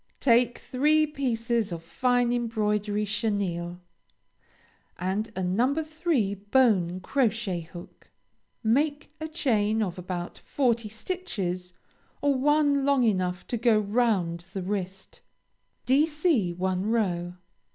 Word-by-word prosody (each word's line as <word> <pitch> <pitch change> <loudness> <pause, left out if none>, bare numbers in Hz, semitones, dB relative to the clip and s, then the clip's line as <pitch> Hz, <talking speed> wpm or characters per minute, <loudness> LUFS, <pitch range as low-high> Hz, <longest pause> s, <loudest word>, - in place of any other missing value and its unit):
Take 240 -1 +3
three 300 +4 +2
pieces 235 -7 -1
of 165 -1 -5
fine 245 +6 +1
embroidery 210 -3 0
chenille, 195 -5 -2 1.2
and 190 +5 -2
a 190 - -2
No. 230 +10 +1
3 310 - 0
bone 200 -4 +2
crochet 225 -6 0
hook. 170 +2 -13 0.5
Make 290 +7 +1
a 315 - -2
chain 220 -9 +1
of 180 -3 -4
about 175 -1 -5
forty 235 -5 0
stitches, 200 - -4 0.5
or 285 0 +2
one 285 +1 +3
long 280 -2 +3
enough 185 -5 0
to 240 - -2
go 225 -1 +4
round 205 -6 +1
the 190 -3 -3
wrist; 190 0 -5 0.6
Dc 290 - +2
one 185 +1 -1
row. 180 -6 0
220 Hz, 110 wpm, -27 LUFS, 185-260 Hz, 1.2 s, go